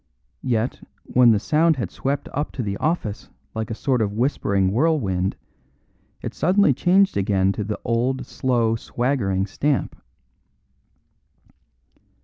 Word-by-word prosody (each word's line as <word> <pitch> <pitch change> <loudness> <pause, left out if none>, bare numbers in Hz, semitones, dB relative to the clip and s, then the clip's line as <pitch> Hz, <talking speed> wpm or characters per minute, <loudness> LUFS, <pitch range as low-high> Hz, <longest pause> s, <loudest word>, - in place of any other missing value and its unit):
Yet, 120 -1 -1 0.2
when 125 -1 +4
the 110 - +5
sound 155 +9 +2
had 120 -9 -4
swept 140 +1 -2
up 145 +2 -2
to 125 - -3
the 100 -2 -2
office 150 -10 -2 0.2
like 110 -1 -4
a 115 - -3
sort 130 0 0
of 105 -2 0
whispering 100 -6 +1
whirlwind, 105 - +1 0.9
it - - -4
suddenly 185 -2 +3
changed 185 - +3
again 95 -1 +2
to 105 - -3
the 105 +1 -4
old 125 +2 0
slow, 120 -3 0
swaggering 115 -6 -1
stamp. 140 +8 -1
120 Hz, 125 wpm, -22 LUFS, 100-140 Hz, 0.9 s, the